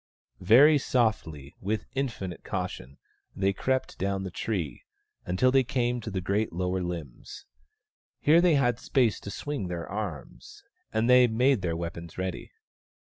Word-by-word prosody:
Very 135 - +6
softly, 80 - -1
with 105 +3 -2
infinite 115 -10 -4
caution, 70 +3 -5 0.4
they 95 0 +1
crept 130 +6 -2
down 95 0 -1
the 95 - -5
tree, 90 - -3 0.5
until 90 +9 +2
they 135 0 +4
came 125 -1 -1
to 110 - -6
the 95 -2 -3
great 100 +4 0
lower 90 +2 -1
limbs. 85 -7 -7 0.7
Here 160 +3 +5
they 175 -3 +4
had 120 -4 +2
space 125 -6 +1
to - - -8
swing 140 -2 -4
their 85 -1 -5
arms, - - -7 0.3
and 110 +1 +1
they 125 0 +7
made 125 +1 +2
their 85 -2 -2
weapons 85 -1 -6
ready. 95 -1 -4
100 Hz, 145 wpm, -28 LUFS, 90-125 Hz, 0.7 s, they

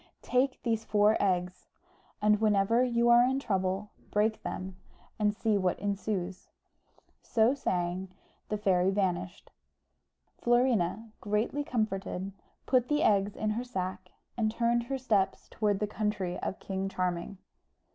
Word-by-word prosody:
Take 255 +1 +1
these 225 -2 0
four 210 0 +3
eggs, 180 -2 -1 0.6
and 210 0 +4
whenever 215 +3 +3
you 235 -1 +2
are 240 0 +8
in 260 +2 +1
trouble, 195 -3 -1 0.2
break 215 +1 +1
them, 185 0 -5 0.4
and 210 -1 +3
see 215 -1 0
what 185 -2 +1
ensues." 200 -2 -3 0.7
So 225 +3 +3
saying, 185 -7 -2 0.4
the 210 - -1
fairy 190 -3 +2
vanished. 185 -2 -2 0.9
Florina, 230 -4 +1
greatly 215 +7 0
comforted, 195 -6 -2 0.3
put 250 -2 +2
the 295 +2 +1
eggs 200 0 +3
in 215 0 -1
her 230 +3 -2
sack, 185 -5 -4 0.3
and 220 -2 +1
turned 235 +1 +1
her 270 +2 -2
steps 215 -7 0
towards 205 -2 0
the 210 - +1
country 210 -4 -2
of 195 - -3
King 195 0 -3
Charming. 180 +1 -2
210 Hz, 135 wpm, -30 LUFS, 190-235 Hz, 0.9 s, are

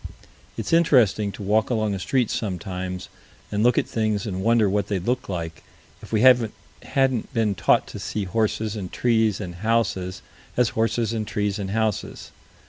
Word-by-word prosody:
It's - - -3
interesting 120 - +4
to - - -8
walk 105 +2 +2
along 110 -4 0
a 95 - -3
street 125 +3 0
sometimes 90 -2 -4 0.4
and 105 0 0
look 120 +2 +4
at - - +2
things 110 -3 -1
and 95 -3 -3
wonder 115 0 +3
what 100 0 0
they'd 95 -3 -2
look 125 -1 -1
like, 85 -3 -4 0.4
if - - -12
we 110 -2 +2
hadn't 125 +1 +2
been 110 -3 +2
taught 85 -4 +3
to - - -7
see 105 - -3
horses 110 +2 -1
and 95 -4 -5
trees 110 -4 +2
and 90 -4 -5
houses 100 -5 0 0.3
as 125 -2 +4
horses 115 0 0
and 110 -2 -2
trees 105 -1 -1
and 95 -1 -3
houses. 110 0 -2
110 Hz, 170 wpm, -24 LUFS, 95-115 Hz, 0.4 s, interesting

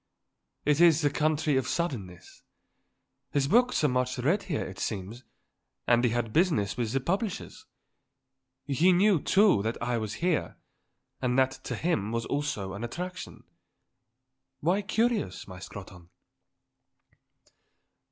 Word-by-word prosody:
It 150 +2 +3
is 165 -2 +6
the 145 -2 +2
country 150 -1 +1
of 130 -1 0
suddenness. 110 - -4 0.9
His 140 -1 0
books 245 - +3
are - - +5
much 125 0 0
read 160 +11 +1
here, 155 -6 -3
it 95 - -9
seems, 110 +4 -4 0.6
and 120 0 +3
he 125 - +4
had 115 -1 -2
business 155 - +2
with 115 -3 -2
his 135 0 -1
publishers. 195 - -3 1.0
He 155 +6 +3
knew, 190 -2 +4
too, 200 - +4
that 110 +3 -3
I 120 0 -1
was 110 -1 -4
here; 175 -2 -1 0.6
and 125 -1 0
that 130 0 +4
to - - -3
him 115 - -1
was 115 0 -2
also 140 -10 -2
an 100 +3 -6
attraction. 180 +9 -6 1.2
Why 180 +7 +1
curious, 215 - -1
my 90 -2 -9
Scrotton?" 90 -3 -11
135 Hz, 135 wpm, -28 LUFS, 115-175 Hz, 1.2 s, is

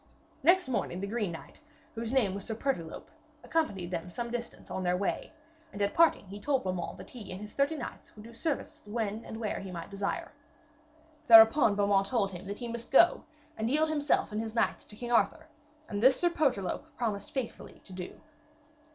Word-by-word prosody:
Next 365 -2 +5
morning 210 -7 -1
the 200 - -2
green 210 -3 -1
knight, 165 - -10 0.3
whose 230 0 -4
name 240 -8 +2
was 200 0 -6
Sir 225 - -3
Pertolope, 215 -10 -3 0.3
accompanied 200 - -1
them 175 0 -3
some 235 +6 -4
distance 240 -1 -6
on 190 - -2
their 180 0 +1
way, 200 - -2 0.4
and 205 - -8
at 200 0 +1
parting 330 -9 +4
he 200 +2 -9
told 270 +4 +1
Beaumains 185 -2 -3
that - - -11
he 230 -5 -9
and 185 - -6
his 210 0 -9
thirty 280 +3 +1
knights - - -8
would 210 - -11
do 230 +1 -12
service 290 +5 -3
when 215 0 -2
and 220 - -7
where 215 -3 -2
he 195 - -7
might 170 -1 -7
desire. 200 0 -3 1.0
Thereupon 225 0 +8
Beaumains 200 -1 +2
told 210 -6 +1
him 180 +1 -8
that 200 +1 -5
he 240 - -5
must 235 0 -6
go 340 +6 +5 0.3
and 220 +1 -1
yield 310 +4 +2
himself 295 -6 +1
and 210 +1 -1
his 225 0 -6
knights - - +1
to 210 - -12
King 240 +2 -6
Arthur, 310 +6 +2 0.4
and 205 -2 -3
this 260 +2 +6
Sir 350 -1 +3
Pertolope 265 - 0
promised 210 -4 -2
faithfully 260 -4 -5
to 190 - -12
do. 180 -1 -7
220 Hz, 200 wpm, -30 LUFS, 195-255 Hz, 1.0 s, Thereupon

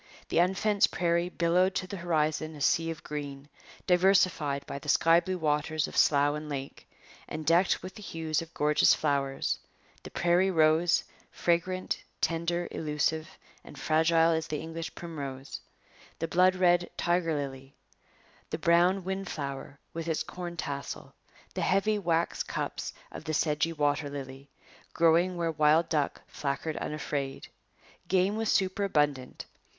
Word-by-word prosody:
The - - +2
unfenced 195 +3 +3
prairie 170 0 0
billowed 180 +2 +2
to 185 - -1
the 195 +2 -6
horizon 155 -2 -1
a 145 - -10
sea 165 +3 +2
of 160 -1 -6
green, 145 -2 -6 0.4
diversified 180 -6 +3
by 140 - -6
the 150 - -7
sky 165 +3 +5
blue 185 +1 -3
waters 155 -1 0
of - - -10
slough 145 0 +4
and 150 0 -6
lake, 135 -1 -6 0.4
and 155 0 -6
decked 170 +4 +3
with 185 0 -7
the 210 - -11
hues 160 -4 -2
of 165 0 -10
gorgeous 150 0 +4
flowers 140 -2 -1 0.4
the - - -9
prairie 175 +2 +2
rose, 160 0 +3 0.3
fragrant, 185 +2 -1 0.2
tender, 170 +1 0
elusive, 155 +1 -1 0.3
and - - -13
fragile 160 +3 +3
as 160 0 -1
the 155 - -3
English 165 0 -6
primrose; 140 -5 -7 0.6
the 165 - -2
blood 185 +2 +4
red 175 -1 +3
tiger 175 -2 +1
lily; 135 -1 -6 0.7
the - - -3
brown 175 +3 +3
windflower 155 -8 -5 0.2
with 165 0 -5
its 160 -1 0
corn 175 +1 -7
tassel; 140 -3 -5 0.4
the - - -3
heavy 205 +3 +2
wax 170 -3 0
cups - - -4 0.2
of - - -8
the 155 -1 -1
sedgy 155 +1 +1
water 145 -2 0
lily, 135 -1 -8 0.4
growing 170 +2 +3
where 165 -1 0
wild 155 +2 +3
duck 150 -3 -1
flackered 150 +2 -3
unafraid. 145 -2 -4 0.6
Game 190 +2 +2
was 220 0 0
superabundant. 155 -9 0
165 Hz, 145 wpm, -29 LUFS, 150-175 Hz, 0.7 s, sky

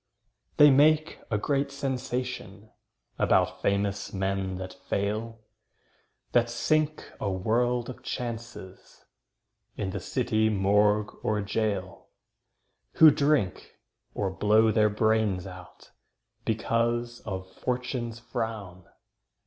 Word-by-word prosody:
They 150 -1 +8
make 155 +3 +4
a 105 - +1
great 140 +5 0
sensation 125 -6 -4 0.5
About - - +2
famous 100 0 0
men 95 -1 -2
that 95 0 -7
fail, 110 +3 -3 0.9
That 120 -1 +3
sink 155 +5 0
a 100 - -1
world 120 +5 0
of 130 - -8
chances 115 -5 -7 0.7
In 95 -2 -2
the - - -4
city 110 0 0
morgue 105 +1 +2
or 105 -1 0
gaol, 100 -3 -3 0.8
Who 160 -1 +8
drink, 140 -9 0 0.4
or 100 -2 -1
blow 110 +3 +3
their 105 0 +3
brains 110 -3 +1
out, 90 -1 -12 0.5
Because 120 +1 0
of 95 -2 -6
"Fortune's 125 -2 -3
frown". 110 -6 -5
110 Hz, 100 wpm, -27 LUFS, 100-120 Hz, 0.9 s, They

